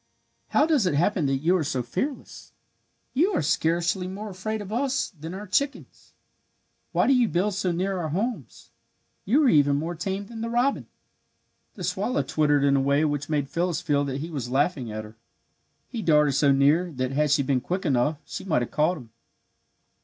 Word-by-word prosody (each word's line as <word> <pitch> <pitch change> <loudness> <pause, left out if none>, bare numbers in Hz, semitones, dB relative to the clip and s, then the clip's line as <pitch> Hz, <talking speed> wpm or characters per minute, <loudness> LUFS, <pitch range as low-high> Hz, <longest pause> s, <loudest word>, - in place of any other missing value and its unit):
"How 295 - +3
does 295 - +2
it 150 - 0
happen 170 0 +1
that 135 +1 -1
you 175 +3 +4
are 165 - -1
so 135 -4 -2
fearless? 255 - -5 0.6
You 350 +10 +2
are - - +1
scarcely 170 +4 0
more 205 +3 -6
afraid 215 +4 -4
of 205 0 -7
us 270 +3 0
than 165 0 -8
our 205 +2 -7
chickens. 280 +9 -3 0.8
Why - - +2
do 270 - +4
you 250 -3 +4
build 200 +2 0
so 190 -2 -1
near 185 +2 -1
our 160 -2 -3
homes? 220 - -4 0.5
You 275 +9 +3
are - - +4
even 145 -6 +4
more 160 +4 -2
tame 190 +4 -4
than 225 +1 -8
the 230 - -3
robin!" 245 +4 0 0.9
The - - -7
swallow 245 - -1
twittered 145 +1 +2
in 140 -1 +4
a 135 - +3
way 140 +3 +2
which 145 -1 -2
made 145 -3 0
Phyllis 175 +2 -1
feel 145 -5 +1
that 135 0 -3
he 165 +2 -6
was 135 -6 -4
laughing 135 -3 0
at 110 0 -5
her. 110 +1 -13 0.7
He 235 - -5
darted 150 -5 +3
so 140 +1 +3
near 150 +6 +3
that 130 -1 -2
had 150 +2 +1
she 140 0 +3
been 130 -1 +1
quick 180 +8 -3
enough 145 +1 +1
she - - -7
might 155 -10 +1
have - - -7
caught 160 +4 +1
him. 120 -6 -13
165 Hz, 200 wpm, -25 LUFS, 140-200 Hz, 0.9 s, you